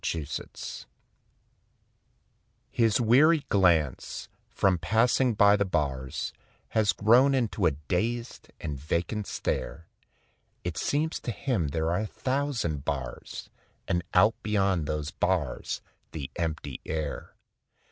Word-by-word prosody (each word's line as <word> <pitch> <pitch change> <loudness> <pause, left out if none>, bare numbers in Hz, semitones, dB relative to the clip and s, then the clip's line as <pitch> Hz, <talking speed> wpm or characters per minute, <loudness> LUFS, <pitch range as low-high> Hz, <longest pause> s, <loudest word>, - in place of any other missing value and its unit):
THE 80 -3 -1
PANTHER 70 - -7 1.8
His 115 -3 +3
weary 145 +8 +5
glance, 85 -9 +2 0.2
from 95 -3 +2
passing 120 +4 +2
by 100 -1 +6
the 100 - +2
bars, 70 -8 -2 0.4
Has 110 -2 +3
grown 125 +6 +5
into 120 -5 +1
a - - +1
dazed 115 +6 -2
and 70 -3 -4
vacant 85 +8 -2
stare; 80 - -3 0.8
It 90 -2 -3
seems 155 - 0
to - - -6
him 110 - -1
there 80 +3 -1
are 90 - +1
a 110 - -2
thousand 130 - -1
bars 65 -4 -5 0.4
And 85 - +1
out 105 +5 +6
beyond 95 -7 +1
those 75 0 -2
bars 85 -9 -1 0.3
the 70 -4 -5
empty 80 -2 -3
air. 80 -2 -4
95 Hz, 115 wpm, -28 LUFS, 80-115 Hz, 1.8 s, by